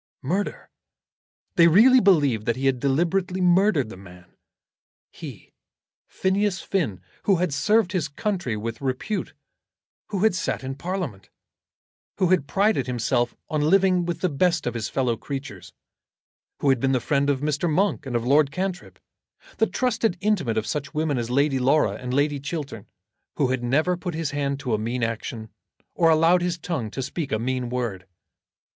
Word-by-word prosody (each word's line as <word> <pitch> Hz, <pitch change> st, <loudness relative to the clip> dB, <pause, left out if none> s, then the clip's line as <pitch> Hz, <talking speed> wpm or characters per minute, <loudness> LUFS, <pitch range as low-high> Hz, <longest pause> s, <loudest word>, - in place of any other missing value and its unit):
Murder! 185 Hz, +9 st, -3 dB, 0.9 s
They 170 Hz, -1 st, +7 dB
really 235 Hz, +10 st, +7 dB
believed 145 Hz, -, +3 dB
that 115 Hz, -, +2 dB
he 130 Hz, +2 st, -3 dB
had 135 Hz, -2 st, +2 dB
deliberately 175 Hz, +7 st, 0 dB
murdered 180 Hz, -, +3 dB
the 110 Hz, -, -9 dB
man; 90 Hz, -2 st, -15 dB, 0.8 s
he, -, -, -10 dB, 0.5 s
Phineas 190 Hz, 0 st, 0 dB
Finn, 150 Hz, -, -2 dB, 0.2 s
who 195 Hz, -, +4 dB
had 175 Hz, -3 st, -1 dB
served 210 Hz, +4 st, +2 dB
his 180 Hz, -6 st, -1 dB
country 160 Hz, -, -2 dB
with 115 Hz, +3 st, -5 dB
repute, 135 Hz, -, -3 dB, 0.7 s
who 195 Hz, -3 st, -3 dB
had 220 Hz, -, +4 dB
sat 175 Hz, -, -2 dB
in 130 Hz, +1 st, -4 dB
Parliament, 140 Hz, -, -5 dB, 0.9 s
who 185 Hz, -, +2 dB
had 180 Hz, -7 st, +2 dB
prided 205 Hz, +1 st, +1 dB
himself 120 Hz, 0 st, 0 dB
on 155 Hz, -1 st, -1 dB
living 190 Hz, -1 st, +4 dB
with 170 Hz, 0 st, -4 dB
the 185 Hz, -, +2 dB
best 170 Hz, +3 st, +1 dB
of 120 Hz, -, -1 dB
his 115 Hz, -2 st, -3 dB
fellow 125 Hz, -3 st, 0 dB
creatures, 135 Hz, +4 st, -7 dB, 0.9 s
who 140 Hz, -, +2 dB
had 135 Hz, -2 st, +3 dB
been 135 Hz, +2 st, +1 dB
the 130 Hz, -, +2 dB
friend 140 Hz, +3 st, 0 dB
of 140 Hz, -2 st, 0 dB
Mr. 150 Hz, +3 st, 0 dB
Monk 195 Hz, -2 st, 0 dB
and 125 Hz, -, -3 dB
of 120 Hz, 0 st, 0 dB
Lord 140 Hz, +2 st, +4 dB
Cantrip, 185 Hz, +4 st, -4 dB, 0.6 s
the 225 Hz, -, +4 dB
trusted 235 Hz, -6 st, 0 dB
intimate 185 Hz, -, 0 dB
of 110 Hz, -, 0 dB
such 140 Hz, +3 st, -4 dB
women 150 Hz, -4 st, 0 dB
as 115 Hz, 0 st, -3 dB
Lady 135 Hz, +1 st, +2 dB
Laura 140 Hz, +4 st, +3 dB
and 125 Hz, -1 st, -6 dB
Lady 145 Hz, +2 st, +1 dB
Chiltern, 140 Hz, -, -6 dB, 0.5 s
who 140 Hz, -4 st, +1 dB
had 130 Hz, -1 st, -1 dB
never 155 Hz, +9 st, +2 dB
put 175 Hz, -1 st, -5 dB
his 160 Hz, -2 st, -2 dB
hand 140 Hz, -1 st, -2 dB
to 125 Hz, -4 st, -2 dB
a 105 Hz, -, +1 dB
mean 120 Hz, +3 st, -2 dB
action, 115 Hz, -1 st, -4 dB, 0.4 s
or 165 Hz, -, +3 dB
allowed 165 Hz, +3 st, +4 dB
his 175 Hz, -1 st, -1 dB
tongue 160 Hz, -10 st, -3 dB
to 135 Hz, +5 st, -4 dB
speak 145 Hz, +1 st, -4 dB
a 110 Hz, -, +1 dB
mean 125 Hz, +1 st, -2 dB
word! 115 Hz, -7 st, -3 dB
145 Hz, 170 wpm, -24 LUFS, 125-180 Hz, 0.9 s, They